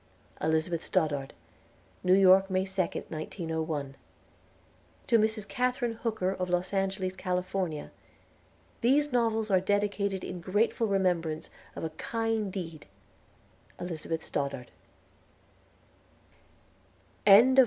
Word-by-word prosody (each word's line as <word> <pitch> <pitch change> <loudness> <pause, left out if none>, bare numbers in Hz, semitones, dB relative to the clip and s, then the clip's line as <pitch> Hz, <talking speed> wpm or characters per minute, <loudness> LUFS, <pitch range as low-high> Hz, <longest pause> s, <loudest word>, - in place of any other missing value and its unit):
ELIZABETH 160 +2 0
STODDARD. 145 -6 0 0.7
New 185 0 +5
York, 190 0 +6
May 185 0 +1
2nd, 190 -2 -2
1901. 160 -3 -3 1.1
TO 230 -2 +4
MRS. 215 -1 0
KATHARINE 250 -2 0
HOOKER 215 -5 0
OF 185 -1 -3
LOS 180 +2 0
ANGELES, 190 -1 -1
CALIFORNIA 180 -4 -2 0.9
THESE 285 +5 +3
NOVELS 225 -3 +1
ARE 190 - +5
DEDICATED 200 0 0
IN 180 -1 -6
GRATEFUL 210 +5 +1
REMEMBRANCE 175 -5 0 0.2
OF - - -6
A 160 - -1
KIND 225 +3 -2
DEED 165 -5 -6 0.9
ELIZABETH 165 -2 -4
STODDARD 140 -3 -3 2.6
CHAPTER 215 +6 +9
I. 260 - +1
185 Hz, 100 wpm, -29 LUFS, 165-215 Hz, 2.6 s, CHAPTER